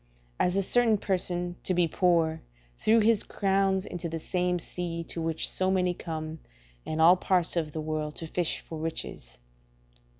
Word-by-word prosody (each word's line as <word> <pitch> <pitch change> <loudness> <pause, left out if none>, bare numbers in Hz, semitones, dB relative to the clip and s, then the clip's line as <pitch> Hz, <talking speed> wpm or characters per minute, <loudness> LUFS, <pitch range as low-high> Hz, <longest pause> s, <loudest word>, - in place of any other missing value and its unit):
A - - +3
certain 215 +4 +3
person, 180 -2 -1
to 185 - 0
be 175 -1 +3
poor, 165 -2 +2 0.4
threw 225 +1 +4
his 220 -1 +4
crowns 195 -1 +1
into 175 -1 -5
the 165 - -3
same 180 +2 -1
sea 170 -1 -4
to 165 - -6
which 160 -1 0
so 185 0 +1
many 180 -1 +2
come, 160 -2 -6 0.5
in 155 - -2
all 170 +3 +8
parts 180 -2 +1
of 160 -3 -1
the 155 - -4
world, 155 -1 -3
to 165 - -5
fish 170 +1 -1
for 160 - -8
riches. 160 - -5
175 Hz, 165 wpm, -28 LUFS, 160-185 Hz, 0.5 s, all